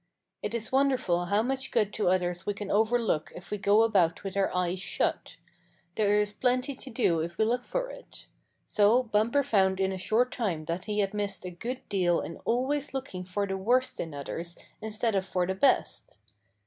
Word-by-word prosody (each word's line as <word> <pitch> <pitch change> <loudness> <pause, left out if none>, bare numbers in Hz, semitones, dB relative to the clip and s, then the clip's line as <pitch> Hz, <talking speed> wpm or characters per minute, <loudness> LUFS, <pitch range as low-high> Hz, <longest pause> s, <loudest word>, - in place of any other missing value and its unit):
It - - -3
is 225 -2 -3
wonderful 260 -10 +2
how 205 +4 +2
much 265 +2 -2
good 210 -1 +1
to 210 - +1
others 180 -1 0
we 205 - -2
can 205 -1 -5
overlook 220 -6 +1
if 180 - -11
we 210 - -2
go 205 +3 +4
about 185 -8 +2
with 195 -1 -5
our 195 -1 +2
eyes 180 0 -1
shut. - - -2 0.6
There 205 +1 +2
is 210 0 +1
plenty 255 +4 +1
to 270 0 -10
do 225 -9 +1
if 170 +2 -4
we 220 - +3
look 245 +2 0
for - - -3
it. - - -12 0.4
So 215 +5 +4
Bumper 230 +5 +2
found 190 -7 +2
in 190 0 +1
a 190 - -4
short 225 +7 +2
time 180 -10 -2
that 170 +3 -3
he 210 -1 0
had 195 0 -1
missed 205 -2 -2
a 180 - -4
good 245 +9 -6
deal 180 -3 +2
in 165 - -6
always 270 +4 0
looking 190 -9 -5
for 200 +3 -1
the 195 -1 -3
worst 245 +7 +1
in 165 - -3
others 170 +5 -6 0.2
instead 220 +1 -1
of 195 -1 +1
for 185 -1 -1
the 190 - -1
best. 225 - +1
205 Hz, 200 wpm, -28 LUFS, 185-240 Hz, 0.6 s, go